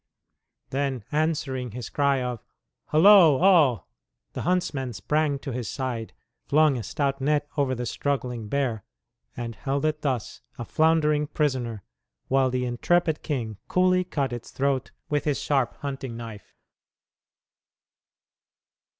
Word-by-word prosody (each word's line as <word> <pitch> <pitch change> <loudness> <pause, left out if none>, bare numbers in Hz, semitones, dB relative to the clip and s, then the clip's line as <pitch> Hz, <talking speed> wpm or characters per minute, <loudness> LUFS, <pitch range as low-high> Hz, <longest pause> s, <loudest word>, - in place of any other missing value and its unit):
Then, 135 -4 -1
answering 145 -6 -1
his 125 -1 -6
cry 140 -2 +2
of 125 -3 -4 0.4
"Holo, 165 -2 +7
all!" 155 - +4 0.5
the - - -4
huntsmen 145 -8 -1
sprang 150 +4 0
to 135 0 -6
his 120 -1 -4
side, 125 -4 -4 0.4
flung 155 -1 +4
a 120 - -3
stout 135 +6 -2
net 145 +1 +1
over 140 -3 +1
the 125 0 -4
struggling 125 -4 -2
bear, 125 -7 -1 0.5
and 115 -1 -4
held 140 +4 -2
it 155 0 0
thus, 130 -6 -2 0.2
a 120 - -5
floundering 150 -1 +2
prisoner, 125 - -1 0.5
while 135 0 +3
the 125 0 -1
intrepid 160 +6 +1
king 115 -8 -3
coolly 185 0 +3
cut 140 -7 -2
its 120 -1 -7
throat 135 -1 -1 0.2
with 150 -2 -1
his 150 -2 0
sharp 135 -5 0
hunting 135 -4 -5
knife. 115 -4 -10
135 Hz, 130 wpm, -26 LUFS, 125-150 Hz, 0.5 s, Holo